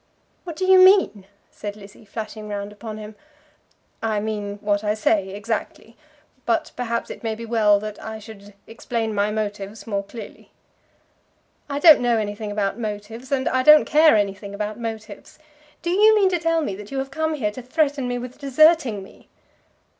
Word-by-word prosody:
"What 340 -3 -6
do 370 - -2
you 375 0 +7
mean?" 370 - +5 0.2
said 205 -1 -7
Lizzie, 205 +1 -15
flashing 215 0 -7
round 205 0 -5
upon 215 +1 -8
him. 215 0 -9 0.9
"I 220 -2 0
mean 205 -1 -4
what 205 0 0
I 210 0 0
say, 210 -2 +1
exactly. 220 +2 -5 0.5
But 230 - 0
perhaps 235 -1 -3
it - - -9
may 225 -1 -2
be 230 +1 -8
well 215 -3 +3
that 215 -1 -7
I 220 0 -6
should 205 -2 -13
explain 225 -1 -4
my 205 0 +1
motives 205 -1 -4
more 200 -3 -2
clearly." 220 +3 -11 1.2
"I 280 - -2
don't 310 -1 +7
know 240 -1 +2
anything 210 0 -4
about 205 +1 -2
motives, 220 +3 -6
and 265 -1 0
I 260 - +1
don't 300 +3 +7
care 310 -2 +5
anything 200 -1 -2
about 210 +2 -4
motives. 220 -3 -7 0.5
Do 345 - -1
you 425 +4 +5
mean 400 -3 +4
to 355 -2 0
tell 330 0 +1
me 205 - -3
that 210 0 -10
you 275 - -5
have 270 0 -3
come 315 +2 -1
here 215 -8 -1
to 255 - -8
threaten 280 0 0
me 245 0 -2
with 250 +1 -8
deserting 280 - +3
me?" - - -18
220 Hz, 180 wpm, -22 LUFS, 205-265 Hz, 1.2 s, you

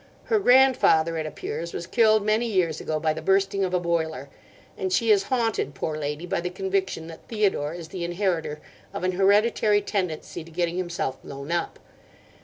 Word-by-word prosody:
Her 445 -3 +1
grandfather, 250 - +4
it 155 - -3
appears, 160 +2 -5
was 170 - -4
killed 215 +1 +3
many 215 +3 +2
years 180 -7 0
ago 155 -1 -2
by 155 0 +1
the 160 - -6
bursting 195 +3 +2
of 185 - -1
a 180 - +1
boiler; 160 -5 -2 0.5
and 190 -1 -3
she 225 +4 +3
is 195 -2 +4
haunted, 225 - 0
poor 155 +3 -3
lady, 150 +2 -4
by 175 - -1
the 180 - -3
conviction 190 -2 -2
that 165 0 -12
Theodore 195 -8 0
is 170 -2 -8
the 180 -2 -5
inheritor 170 -4 -2 0.3
of - - -4
an 185 - +2
hereditary 205 +2 +3
tendency 180 -6 -3
to 165 - -14
getting 170 +1 -1
himself 175 -7 -3
blown 140 +3 -8
up. 170 -1 -1
180 Hz, 185 wpm, -25 LUFS, 160-200 Hz, 0.5 s, grandfather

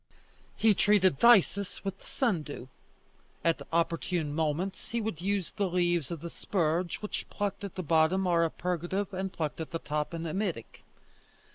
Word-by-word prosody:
He 220 -1 +4
treated 190 -6 +3
phthisis 200 -4 +4
with 195 -1 -4
the - - -18
sundew; 155 - -2 0.8
at 165 -1 +2
opportune 165 -1 0
moments 165 +5 -2
he 235 - -1
would 210 -7 -3
use 195 -1 -1
the 200 -3 -1
leaves 175 -4 +1
of 170 -3 -5
the 170 - -5
spurge, 170 0 -1
which 210 - -4
plucked 205 -1 -3
at 200 - -6
the 185 - -3
bottom 160 +4 +3
are 170 -2 +3
a 165 - +2
purgative 180 +4 -2
and 190 0 -2
plucked 160 -1 -3
at 160 - -5
the 165 - -2
top, 150 +1 -3
an 165 0 -4
emetic. 170 - -3
175 Hz, 165 wpm, -30 LUFS, 160-195 Hz, 0.8 s, He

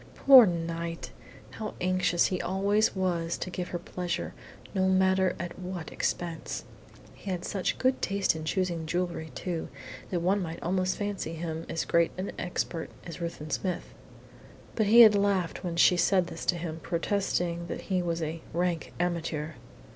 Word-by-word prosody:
Poor 260 -5 +9
Knight! 165 -1 -3 0.4
How 215 -1 -6
anxious 180 -1 +2
he 185 - 0
always 200 +3 +1
was 170 -3 0
to 185 - -5
give 180 0 -3
her 175 - -3
pleasure, 175 0 -4 0.4
no 190 -2 +2
matter 190 -1 +3
at 175 +1 -5
what 180 -3 -6
expense! 170 -2 -3 0.5
He 200 - -9
had 180 -2 -2
such 195 -2 -1
good 260 0 +1
taste 200 -3 +1
in 160 - -5
choosing 170 -1 -1
jewellery, 175 -1 -2
too, 170 +4 -3 0.4
that 175 -2 -1
one 195 +4 +2
might 165 -2 -5
almost 185 +1 0
fancy 205 -5 -3
him 160 0 -4
as 165 - -1
great 170 0 +3
an 185 +2 -3
expert 175 -2 -3 0.2
as 170 0 -8
Ruthven 165 -2 -5
Smith. 185 -2 -2 0.8
But 215 -3 +2
he 235 +3 +9
had 220 -2 +10
laughed 200 -4 +1
when 175 -2 -3
she 175 +1 +5
said 185 +1 +3
this 175 - -7
to 180 - +3
him, 165 -1 -5
protesting 170 0 -1
that - - -5
he 185 -2 0
was 170 -1 -1
a 160 +1 -4
"rank 175 0 -1
amateur." 165 -3 -1
175 Hz, 165 wpm, -29 LUFS, 170-190 Hz, 0.8 s, had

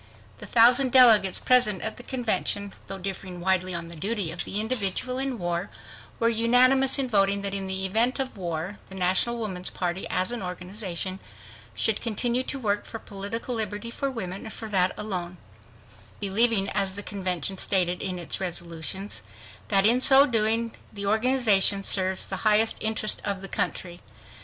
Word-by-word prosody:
The - - -9
thousand 245 +3 +5
delegates 225 -7 +6
present 245 -7 +3
at 220 - -4
the - - -9
convention, 215 -5 -1
though 195 - -5
differing 185 -1 -6
widely 185 0 0
on 170 -1 -5
the 170 - -10
duty 200 0 -2
of 175 - -5
the 205 - -2
individual 220 +2 -1
in 265 -2 -2
war, 175 0 -3 0.5
were 230 - +2
unanimous 250 +4 +4
in 270 -2 0
voting 200 -3 +2
that 200 -1 0
in 195 -1 -2
the 190 0 -1
event 225 +6 +1
of 265 -3 -4
war, 175 +1 -5
the 190 - -9
National 190 +6 +1
Woman's 190 -5 -4
Party, 180 +1 -3
as 185 +4 0
an 240 - -3
organization, 185 0 -4 0.6
should 220 -2 0
continue 235 +2 0
to 275 - -4
work 210 -5 -2
for 225 - -7
political 215 +4 -6
liberty 220 0 -3
for 275 +3 -3
women 195 -7 -6
and 220 - -8
for 225 - -7
that 185 -2 +2
alone, 180 -4 -4 0.8
believing 205 0 +2
as 190 -1 -1
the 205 - -6
convention 190 -2 -3
stated 180 -2 0
in 185 -2 -4
its 175 +2 -5
resolutions, 175 - -4 0.5
that 195 -1 +3
in 240 +3 +5
so 270 +1 +7
doing 225 -1 0 0.2
the 200 -1 -6
organization 215 -3 +2
"serves 190 -1 +3
the 190 - -4
highest 215 +2 +3
interest 220 -1 -1
of 200 -2 -3
the 195 - -6
country." 175 -2 -4
200 Hz, 170 wpm, -25 LUFS, 185-230 Hz, 0.8 s, so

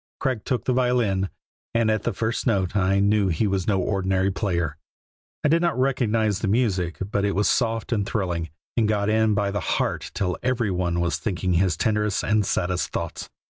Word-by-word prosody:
Craig 130 -5 -1
took 125 -3 -1
the 130 - +2
violin, 120 -7 +1 0.5
and 115 -1 +3
at 110 - 0
the 120 - -1
first 115 +5 -2
note 95 -4 +1
I 100 -1 +2
knew 100 0 +3
he 95 +5 +1
was 95 -3 -1
no 100 -3 +2
ordinary 95 0 +1
player. 85 -6 -1 0.7
I - - +4
did 165 +3 +3
not 170 -6 0
recognize 115 -6 +1
the 110 - -2
music, 95 -6 +1
but 100 -2 0
it 100 -1 0
was 105 +2 +2
soft 115 -2 0
and 105 -4 +1
thrilling, 90 -6 -2 0.3
and 115 -3 +2
got 105 -1 +1
in 110 -1 +3
by 100 -1 0
the 105 - -1
heart - - -1
till 90 -2 -1
every 120 -5 0
one 90 -1 0
was 85 - 0
thinking 90 -3 -1
his 85 -1 +2
tenderest 105 0 0
and 105 0 +2
saddest 90 -2 -1
thoughts. 85 -1 -4
100 Hz, 195 wpm, -24 LUFS, 95-115 Hz, 0.7 s, I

